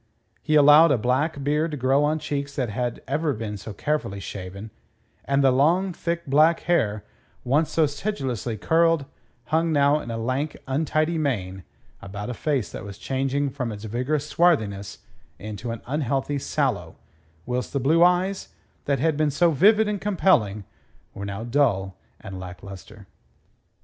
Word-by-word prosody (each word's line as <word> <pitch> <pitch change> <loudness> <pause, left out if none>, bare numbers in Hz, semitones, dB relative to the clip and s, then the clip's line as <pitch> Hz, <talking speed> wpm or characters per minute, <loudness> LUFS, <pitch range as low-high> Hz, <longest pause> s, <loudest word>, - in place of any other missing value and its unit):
He 155 - 0
allowed 150 +2 +7
a 135 - +3
black 135 +6 0
beard 150 +3 +1
to 150 - -5
grow 135 +2 +2
on 150 +1 +1
cheeks 145 -2 -4
that 125 -4 -1
had 120 +2 -3
ever 150 +2 0
been 105 -2 -5
so 105 +2 -8
carefully 125 -3 -2
shaven; 100 +2 -8 0.5
and 140 0 +1
the 135 - +5
long, 170 +8 +2
thick 170 0 -3
black 155 +4 +4
hair, 105 -12 0 0.4
once 145 +5 +1
so 160 - +2
sedulously 135 - -3
curled, 165 - +2 0.5
hung 165 +1 +2
now 145 0 +3
in 120 - -8
a 115 - -3
lank, 130 +6 -2
untidy 155 +4 0
mane 95 - -2 0.4
about 100 +4 -6
a - - -4
face 135 -1 -1
that - - -7
was 100 -1 -9
changing 135 +2 -1
from 125 -4 -4
its 105 0 -8
vigorous 130 +7 -2
swarthiness 110 - 0 0.5
to 120 +4 -6
an 115 0 -6
unhealthy 140 0 -1
sallow, - - -2 0.5
whilst 125 0 -3
the 140 - -1
blue 160 +6 +4
eyes, 180 +2 +2 0.4
that 140 -1 +1
had 160 +3 +1
been 155 0 +1
so 165 +4 +2
vivid 210 +8 +4
and 210 -2 -2
compelling, 145 - +2 0.5
were 100 - -6
now 100 +2 -5
dull 115 -7 +1 0.2
and 95 -1 -8
lacklustre. 95 +2 -10
140 Hz, 160 wpm, -24 LUFS, 110-155 Hz, 0.5 s, allowed